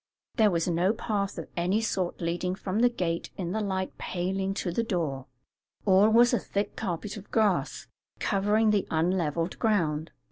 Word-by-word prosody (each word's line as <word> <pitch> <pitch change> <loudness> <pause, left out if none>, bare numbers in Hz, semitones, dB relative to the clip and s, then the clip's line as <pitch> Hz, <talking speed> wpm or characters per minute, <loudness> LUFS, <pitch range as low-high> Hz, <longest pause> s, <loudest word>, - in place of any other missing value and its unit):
There 220 -3 +5
was 170 -2 0
no 175 +4 +2
path 205 -3 -2
of - - -5
any 180 +5 +1
sort 190 -6 -2
leading 175 +2 -1
from 190 +1 -2
the 245 +1 +5
gate 175 -8 -2
in 175 -2 -3
the 215 +3 -1
light 190 -2 -3
paling 190 +2 -2
to 180 - -2
the 205 - 0
door; 160 - -2 0.6
all 195 +1 +6
was 235 +2 +5
a 240 - +3
thick 200 +2 -3
carpet 200 +1 -4
of 205 - -11
grass, 210 -5 +1 0.3
covering 210 +2 +2
the 205 -2 +1
unlevelled 165 0 0
ground. 165 -9 +1
190 Hz, 170 wpm, -28 LUFS, 175-210 Hz, 0.6 s, all